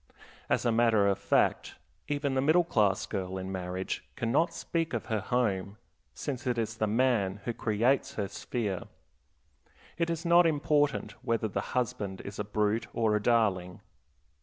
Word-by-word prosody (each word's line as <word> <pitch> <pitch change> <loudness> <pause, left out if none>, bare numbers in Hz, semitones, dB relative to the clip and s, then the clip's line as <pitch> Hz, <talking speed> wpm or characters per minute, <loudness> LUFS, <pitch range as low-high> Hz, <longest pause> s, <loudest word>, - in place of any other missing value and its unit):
As - - +1
a 120 - +3
matter 115 -3 +4
of 100 - +1
fact, - - +1 0.3
even 145 -2 -1
the 130 - +2
middle 160 +5 +4
class 105 - +2
girl 95 -2 -4
in 95 0 -5
marriage 95 0 -3
can 115 -1 -2
not 165 +6 +3
speak 165 -1 -2
of - - -3
her 110 - +2
home, 100 -3 -1 0.4
since 135 -2 -4
it 120 -1 0
is 110 -1 -2
the 110 - +1
man 105 -4 +1
who 120 - -1
creates 115 +5 +1
her 100 -2 -1
sphere. 100 -2 -3 1.1
It 170 0 +1
is 165 0 -3
not 170 0 +6
important 145 -2 +1
whether 115 -1 0
the 100 - -2 0.2
husband 100 -5 -2
is 100 +1 -8
a - - 0
brute 105 +2 0
or 110 -2 +2
a 105 - 0
darling. 100 -6 +1
115 Hz, 165 wpm, -30 LUFS, 100-135 Hz, 1.1 s, not